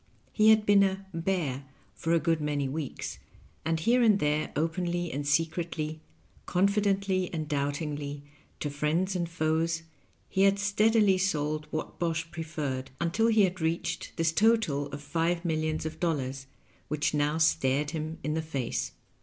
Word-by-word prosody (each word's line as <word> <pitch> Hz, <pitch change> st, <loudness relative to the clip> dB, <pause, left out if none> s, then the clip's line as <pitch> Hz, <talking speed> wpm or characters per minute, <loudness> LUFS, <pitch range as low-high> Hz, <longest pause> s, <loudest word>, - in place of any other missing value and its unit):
He 215 Hz, 0 st, +5 dB
had 220 Hz, -1 st, +5 dB
been 205 Hz, -1 st, +6 dB
a 195 Hz, 0 st, +1 dB
"bear" 165 Hz, -6 st, -1 dB, 0.3 s
for 165 Hz, +11 st, -3 dB
a 170 Hz, -, +4 dB
good 165 Hz, 0 st, +1 dB
many 145 Hz, -2 st, 0 dB
weeks, 145 Hz, +1 st, -5 dB, 0.4 s
and 160 Hz, +1 st, 0 dB
here 240 Hz, +10 st, +3 dB
and 215 Hz, -4 st, +5 dB
there, 150 Hz, -3 st, 0 dB
openly 175 Hz, +2 st, -1 dB
and 145 Hz, +2 st, -3 dB
secretly, 155 Hz, 0 st, -1 dB, 0.5 s
confidently 195 Hz, -1 st, +1 dB
and 155 Hz, -3 st, -3 dB
doubtingly, 145 Hz, 0 st, -2 dB, 0.4 s
to 145 Hz, -, -2 dB
friends 160 Hz, +7 st, 0 dB
and 170 Hz, -2 st, -1 dB
foes, 160 Hz, 0 st, 0 dB, 0.4 s
he 190 Hz, -, 0 dB
had 195 Hz, 0 st, +5 dB
steadily 205 Hz, -1 st, +3 dB
sold 155 Hz, -5 st, 0 dB
Whatbosh 165 Hz, +1 st, -3 dB
Pre 165 Hz, 0 st, -4 dB
ferred, 140 Hz, -5 st, -3 dB
until 180 Hz, +7 st, +2 dB
he 220 Hz, -2 st, +5 dB
had 185 Hz, -1 st, 0 dB
reached 160 Hz, +1 st, -2 dB
this 165 Hz, -1 st, +2 dB
total 205 Hz, -8 st, +2 dB
of 145 Hz, 0 st, -8 dB
five 165 Hz, +4 st, 0 dB
millions 155 Hz, -1 st, -1 dB
of 160 Hz, -, -5 dB
dollars, 135 Hz, -5 st, -2 dB, 0.4 s
which 150 Hz, 0 st, 0 dB
now 150 Hz, +1 st, +1 dB
stared 145 Hz, -2 st, +2 dB
him 160 Hz, 0 st, -4 dB
in 150 Hz, +2 st, -1 dB
the 160 Hz, -, 0 dB
face. 140 Hz, -6 st, -3 dB
160 Hz, 155 wpm, -29 LUFS, 150-185 Hz, 0.5 s, been